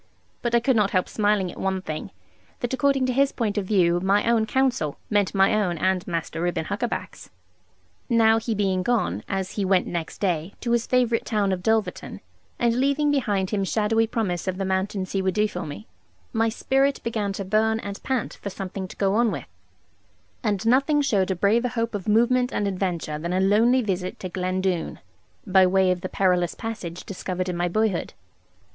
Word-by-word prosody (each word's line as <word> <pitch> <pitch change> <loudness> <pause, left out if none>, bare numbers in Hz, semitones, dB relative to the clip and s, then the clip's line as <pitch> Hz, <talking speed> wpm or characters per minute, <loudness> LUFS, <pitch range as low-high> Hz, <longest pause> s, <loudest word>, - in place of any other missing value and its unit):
But 240 0 0
I - - +6
could 250 +2 +2
not 210 -3 +3
help 185 -2 +1
smiling 205 -4 +1
at - - -12
one 190 0 0
thing, 155 -3 -5 0.5
that 245 0 -2
according 275 0 +2
to 255 - 0
his 275 +2 +3
point 215 -4 -2
of 190 - -5
view 175 -4 +3
my 195 +4 +2
own 230 -2 +3
counsel 245 - 0
meant 205 -1 +1
my 195 +1 +4
own 195 -5 +1
and 185 +2 0
Master 165 -1 -3
Reuben 175 -2 -1
Huckaback's. - - -4 0.8
Now 225 -1 +4
he 225 0 -2
being 190 -2 +1
gone, 185 - 0
as 190 -1 -2
he 205 - -2
went 190 -1 +2
next 170 -2 -4
day, 180 -1 -1
to 235 - -2
his 235 -1 +1
favourite 245 -2 +2
town 210 -4 0
of 185 -1 -2
Dulverton, 220 +2 -1 0.4
and 235 0 +1
leaving 280 +2 +2
behind 205 -9 0
him 205 -2 0
shadowy 225 +3 +1
promise 195 -6 -2
of 185 -1 -1
the 195 - -2
mountains 190 0 -2
he 195 - 0
would 190 -1 -1
do 210 0 +3
for - - -6
me, 110 -8 -8 0.5
my 225 0 +2
spirit 270 +4 +1
began 215 -3 -1
to 195 0 -5
burn 220 +3 +2
and 200 0 -7
pant 260 -4 -2
for 200 - -4
something 190 0 -5
to - - -11
go 195 -1 +1
on 230 +2 +3
with; - - -4 1.0
and 210 -3 -1
nothing 275 +5 +3
showed 200 -9 +1
a 190 - 0
braver 215 +7 +2
hope 230 -1 -2
of 205 -1 -5
movement 245 +4 +3
and 205 - -1
adventure 180 -5 -2
than 170 +3 -3
a 185 - +1
lonely 225 +6 +4
visit 185 -3 -3
to 185 - -5
Glen 185 +1 -2
Doone, 185 -3 -2 0.5
by 190 -2 +5
way 190 0 +3
of 180 -1 -2
the 185 - -4
perilous 180 -3 +1
passage 200 -7 -6
discovered 185 -1 -4
in 180 - -2
my 175 +1 0
boyhood. 210 0 -1
200 Hz, 200 wpm, -24 LUFS, 185-230 Hz, 1.0 s, I